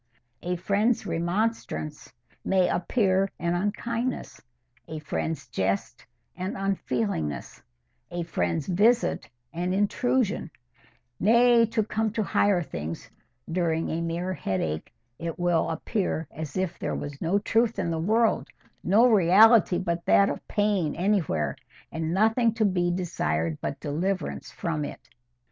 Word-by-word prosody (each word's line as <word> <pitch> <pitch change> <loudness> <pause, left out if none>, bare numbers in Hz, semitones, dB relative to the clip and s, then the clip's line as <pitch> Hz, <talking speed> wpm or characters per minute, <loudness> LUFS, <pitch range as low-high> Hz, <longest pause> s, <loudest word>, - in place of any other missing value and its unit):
A 180 +1 -2
friend's 205 +6 +1
remonstrance 175 - -2 0.3
may 190 -2 +3
appear 190 +1 +1
an 170 0 -1
unkindness—a 160 - -4
friend's 155 -1 -3
jest 95 -3 -2 0.3
an 185 +2 -4
unfeelingness—a 115 - -4
friend's 90 - -1
visit 220 +7 +2 0.2
an 180 +2 -1
intrusion; 210 +3 +1 0.7
nay, 235 +2 +5
to 225 -1 0
come 220 +1 -1
to 220 - 0
higher 195 -3 +2
things, 80 - -6 0.4
during 165 -2 0
a 165 - -1
mere 170 +2 -2
headache 80 - -3 0.3
it 165 -1 -4
will 175 -2 +1
appear 165 - -2
as 155 0 -6
if 185 -2 -2
there - - -2
was 145 -1 -6
no 175 +5 +2
truth 225 +2 +1
in 175 -4 -1
the 165 - -1
world, 220 +6 +2 0.4
no 215 +6 +5
reality 210 -1 +6
but 170 -1 -2
that 200 - +5
of - - -7
pain 205 -7 +1
anywhere, 175 - 0 0.4
and 160 0 -2
nothing 225 +4 +3
to 220 -1 +2
be 180 -3 +1
desired 85 - -1
but 140 - -4
deliverance 180 +6 -2
from 160 -3 -3
it. - - -8
175 Hz, 125 wpm, -26 LUFS, 155-205 Hz, 0.7 s, reality